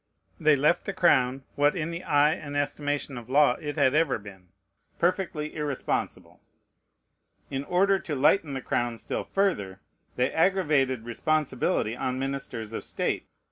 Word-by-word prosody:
They 155 Hz, -2 st, +5 dB
left 150 Hz, +6 st, +2 dB
the -, -, -3 dB
crown, 130 Hz, -5 st, +3 dB
what 145 Hz, +3 st, +2 dB
in 165 Hz, -1 st, -2 dB
the 170 Hz, +1 st, -6 dB
eye 145 Hz, +1 st, +4 dB
and 145 Hz, -2 st, -5 dB
estimation 145 Hz, -2 st, -2 dB
of 120 Hz, -, -14 dB
law 145 Hz, 0 st, +5 dB
it 145 Hz, -2 st, -4 dB
had 130 Hz, -, +3 dB
ever 155 Hz, -2 st, +2 dB
been, 100 Hz, -3 st, -13 dB, 0.5 s
perfectly 175 Hz, -3 st, -1 dB
irresponsible. 150 Hz, -3 st, -3 dB, 1.1 s
In 135 Hz, 0 st, -2 dB
order 195 Hz, +3 st, +3 dB
to 155 Hz, -, -4 dB
lighten 145 Hz, +2 st, +3 dB
the 135 Hz, -, -3 dB
crown 120 Hz, -1 st, -1 dB
still -, -, -4 dB
further, 100 Hz, -, -1 dB, 0.4 s
they 125 Hz, +1 st, +1 dB
aggravated 150 Hz, -9 st, +2 dB
responsibility 130 Hz, -3 st, 0 dB
on 130 Hz, 0 st, -2 dB
ministers 135 Hz, -5 st, -4 dB
of -, -, -4 dB
state. -, -, -2 dB
145 Hz, 145 wpm, -27 LUFS, 130-155 Hz, 1.1 s, They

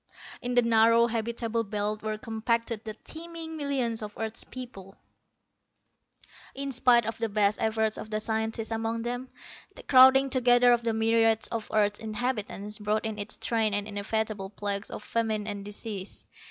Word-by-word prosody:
In 245 Hz, 0 st, -2 dB
the 245 Hz, -, +5 dB
narrow 230 Hz, 0 st, +5 dB
habitable 230 Hz, 0 st, -1 dB
belt 210 Hz, 0 st, -2 dB
were 215 Hz, 0 st, -3 dB
compacted 230 Hz, 0 st, -2 dB
the 215 Hz, -2 st, -6 dB
teeming 325 Hz, 0 st, -8 dB
millions 265 Hz, -7 st, -1 dB
of 210 Hz, -1 st, -7 dB
earth's 220 Hz, 0 st, -3 dB
peoples._ 200 Hz, -7 st, -10 dB, 1.6 s
_In 275 Hz, -1 st, -3 dB
spite 240 Hz, -2 st, +4 dB
of 225 Hz, +1 st, -4 dB
the 225 Hz, -, -1 dB
best 205 Hz, 0 st, +2 dB
efforts 220 Hz, -1 st, 0 dB
of 215 Hz, -, -7 dB
the 215 Hz, 0 st, -1 dB
scientists 220 Hz, +1 st, -2 dB
among 225 Hz, 0 st, -2 dB
them, 245 Hz, +2 st, -4 dB, 0.5 s
the -, -, -11 dB
crowding 265 Hz, +1 st, +7 dB
together 245 Hz, -1 st, +5 dB
of 240 Hz, -, +2 dB
the 230 Hz, -1 st, 0 dB
myriads 225 Hz, 0 st, +3 dB
of 230 Hz, -2 st, -4 dB
earth's 210 Hz, -1 st, +2 dB
inhabitants 215 Hz, -2 st, -3 dB
brought 215 Hz, +2 st, -1 dB
in 220 Hz, -1 st, -4 dB
its 205 Hz, +1 st, -4 dB
train 220 Hz, -2 st, +1 dB
the 205 Hz, 0 st, 0 dB
inevitable 210 Hz, -1 st, -2 dB
plagues 200 Hz, 0 st, -2 dB
of -, -, -7 dB
famine 220 Hz, -2 st, -1 dB
and 205 Hz, -2 st, -5 dB
disease. 205 Hz, -1 st, -6 dB
225 Hz, 160 wpm, -28 LUFS, 210-235 Hz, 1.6 s, crowding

